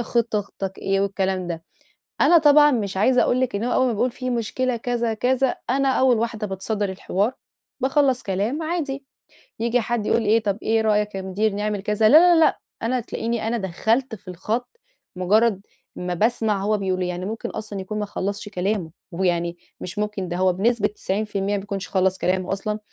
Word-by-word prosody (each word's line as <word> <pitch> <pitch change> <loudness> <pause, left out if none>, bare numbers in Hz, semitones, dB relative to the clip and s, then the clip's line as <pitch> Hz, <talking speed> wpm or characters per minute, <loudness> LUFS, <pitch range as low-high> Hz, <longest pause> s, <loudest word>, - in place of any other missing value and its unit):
خط 235 -1 0
خطتك 195 -1 -4
إيه 195 0 0
والكلام 190 -2 -1
ده. 165 -1 -4 0.6
أنا 345 - +7
طبعًا 295 -1 +6
مش 205 -7 -1
عايزة 245 +5 +4
أقول 255 - +2
لِك 255 - 0
إن 215 - -2
هو 245 - -1
أول 260 - +3
ما 240 - +1
بيقول 245 +4 +1
في 255 +1 -4
مشكلة 245 +2 -1
كذا 235 -1 -1
كذا، 255 +3 +1
أنا 275 +1 +2
أول 260 -2 +4
واحدة 225 -2 -2
باتصدّر 200 +2 -2
الحوار، 195 +4 -1 0.5
باخلّص 265 -1 +2
كلام 205 - -1
عادي، 290 -5 -3 0.6
ييجي 235 +2 +1
حد 235 -2 -2
يقول 230 - +2
إيه 220 +2 +3
طَب 200 -1 0
إيه 225 0 +2
رأيك 210 -2 +1
يا 190 - -3
مدير 200 +3 0
نعمل 205 -1 -2
كذا، 210 +1 +3
لا 305 - +9 0.2
لا 325 - +4
لأ، - - +1 0.2
أنا 250 +3 0
تلاقيني 230 -1 -3
أنا 235 +1 0
دخّلت 220 +6 0
في 195 -1 -20
الخط، 215 +7 -3 0.5
مجرد 205 +2 +3 0.3
ما 180 0 -3
باسمع 215 0 +1
هو 210 +1 +1
بيقولول 185 -2 -1
إيه، 180 - -1
يعني 180 +1 -4
ممكن 220 +3 -4
أصلًا 210 -2 -6
يكون 215 +3 -4
ما 210 - -1
خلصش 205 +2 -4
كلامه، 190 -3 -2 0.2
ويعني 175 -1 0 0.2
مش 185 +3 -5
ممكن، 210 -3 -2
ده 175 - -3
هو 185 0 +3
بنسبة 210 +3 +2
90% 200 -1 -2
ما - - -1
بيكونش 195 -3 -5
خلص 190 0 +1
كلامه 185 +1 0
أصلًا، 210 +2 -3
210 Hz, 190 wpm, -23 LUFS, 195-235 Hz, 0.6 s, لا